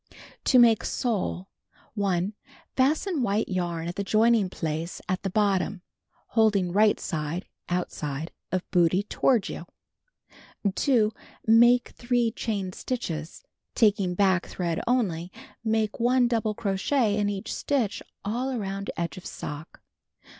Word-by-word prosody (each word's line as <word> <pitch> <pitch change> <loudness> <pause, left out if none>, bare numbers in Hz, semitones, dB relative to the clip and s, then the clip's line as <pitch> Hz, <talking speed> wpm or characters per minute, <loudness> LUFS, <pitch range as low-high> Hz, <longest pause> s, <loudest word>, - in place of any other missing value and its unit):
To 260 - +5
Make 235 -3 +6
Sole: 200 -5 -2 0.5
1. 195 -2 0 0.4
Fasten 305 +5 +2
white 210 -2 +1
j'arn 175 -3 -2
at 175 - -5
the 200 - -1
joining 220 -1 +3
place 165 -1 -4
at 185 -1 -1
the 195 - -2
bottom, 195 -2 +1 0.5
holding 205 -5 +3
right 210 +3 +4
side 160 +2 -3 0.2
(outside) 160 -4 -3 0.2
of 185 -1 -1
bootee 180 +3 +3
toward 245 -6 +3
j'ou. 170 - -6 1.1
2. 225 -3 +3 0.4
IMake 240 +2 +6
3 240 -1 0
chain 200 -5 -3
stitches. 165 - -4 0.3
Taking 200 -5 +3
back 190 -2 +2
thread 170 -3 -2
onl}^, 185 -9 +1 0.3
make 220 -1 0
1 245 +1 +4
double 225 -3 0
crochet 210 +3 +1
in 205 -1 +1
each 200 +2 -4
stitch 255 -8 -1 0.2
all 240 +6 -1
around 200 -5 -3
edge 170 +1 -3
of 185 - -10
sock. 150 +2 -7
205 Hz, 125 wpm, -26 LUFS, 180-230 Hz, 1.1 s, Make